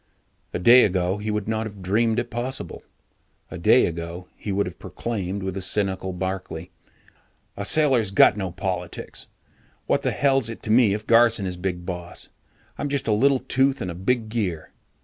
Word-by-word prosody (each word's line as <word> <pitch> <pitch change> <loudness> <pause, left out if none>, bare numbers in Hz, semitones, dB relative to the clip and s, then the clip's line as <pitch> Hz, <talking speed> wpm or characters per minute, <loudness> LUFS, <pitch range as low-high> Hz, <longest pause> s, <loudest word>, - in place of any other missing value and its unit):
A - - -2
day 120 +8 +7
ago, 95 0 0
he 105 +1 -4
would 105 -1 -2
not 110 0 -1
have 100 -3 -11
dreamed 110 +4 +1
it 120 0 -2
possible. 125 +3 -5 0.7
A - - -6
day - - +5
ago, 85 +2 -5
he 105 - -5
would 100 +1 +1
have 90 - -8
proclaimed 100 -4 -4
with 95 -1 -3
the 95 - -4
cynical 95 -1 +1
Barkley, 90 -1 -5 0.8
"A 100 - -4
sailor's 130 -4 +4
got 100 - +5
no 95 -3 -3
politics. - - -5 0.6
What - - +1
the - - 0
hell's 135 -4 +2
it 115 - -8
to 110 - -1
me 110 -3 +5
if 105 0 -7
Garson 115 -3 +4
is 90 -1 -3
Big 90 -1 -4
Boss? 90 -1 -5 0.5
I'm 145 - -2
just 140 -3 -1
a 110 - +3
little 135 +6 +3
tooth 135 +1 +1
in 90 - -3
a - - -6
big 110 +5 -1
gear. 100 -8 -3
105 Hz, 185 wpm, -24 LUFS, 95-120 Hz, 0.8 s, day